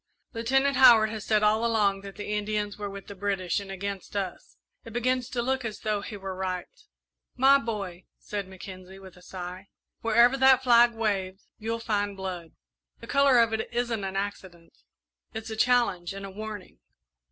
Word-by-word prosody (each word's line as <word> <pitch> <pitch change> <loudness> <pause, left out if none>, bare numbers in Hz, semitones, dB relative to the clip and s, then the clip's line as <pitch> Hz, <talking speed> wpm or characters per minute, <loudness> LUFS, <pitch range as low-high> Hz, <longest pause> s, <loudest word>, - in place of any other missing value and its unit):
"Lieutenant 270 +4 +1
Howard 225 -4 +7
has 220 -2 -5
said 215 -1 +2
all 215 +2 +3
along 210 -4 +2
that 195 -1 -10
the 210 0 -6
Indians 210 0 -2
were 205 -1 -5
with 200 -1 -9
the 200 - -9
British 195 -2 -1
and 200 -1 -9
against 195 +1 -6
us. 195 -3 -5 0.3
It 230 - -11
begins 250 +1 0
to 240 -2 -2
look 265 +1 -1
as 220 -2 -5
though 215 -2 -1
he 205 +1 -7
were 195 -1 -6
right." 185 -1 -3 0.7
"My 270 +2 +6
boy," 200 -7 -5
said 200 -2 -5
Mackenzie, 190 0 -10
with 190 -2 -13
a 180 - -17
sigh, 180 +1 -8 0.3
"wherever 235 +3 +4
that 265 -1 +5
flag 240 -1 +5
waves, 195 -4 -2
you'll 225 +1 -2
find 205 -3 -2
blood. 180 -4 -6 0.5
The - - -10
colour 280 -2 +4
of 230 -1 +4
it 220 - -3
isn't 235 -3 -1
an 190 0 -4
accident 190 -4 -5 0.6
it's 220 0 -5
a - - -3
challenge 220 -7 +2
and 195 0 -6
a 195 - -8
warning." 210 - -8
210 Hz, 180 wpm, -27 LUFS, 195-230 Hz, 0.7 s, Howard